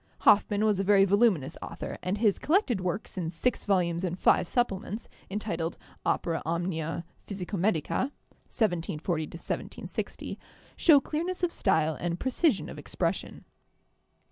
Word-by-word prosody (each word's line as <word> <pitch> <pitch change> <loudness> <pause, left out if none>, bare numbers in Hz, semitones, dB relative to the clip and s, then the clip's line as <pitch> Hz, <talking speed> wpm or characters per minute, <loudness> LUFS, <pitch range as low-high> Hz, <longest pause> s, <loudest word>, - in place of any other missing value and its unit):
Hoffmann 205 0 +5
was 210 -3 +2
a - - +2
very 195 0 +6
voluminous 195 - +2
author, - - -6
and 185 +3 -1
his 210 -2 +2
collected 295 - +2
works 185 +1 -3
in 165 -2 -2
six 205 +9 -1
volumes 175 -3 +1
and 180 -1 -1
five 180 - +4
supplements, 215 -2 -1 0.2
entitled 175 -5 -3 0.3
'Opera 165 -2 0
Omnia 165 0 -2 0.2
Phys 200 -3 -4
ico 190 - -4
medica' 200 - +1 0.4
(1740 170 -5 0
1760), 170 +2 -5 0.4
show 310 -4 +7
clearness 340 +6 -3
of 350 - +2
style 160 0 +2
and 175 0 -2
pre 260 - -1
cision 320 +4 +2
of - - -8
expression. - - -3
190 Hz, 140 wpm, -29 LUFS, 170-220 Hz, 0.4 s, show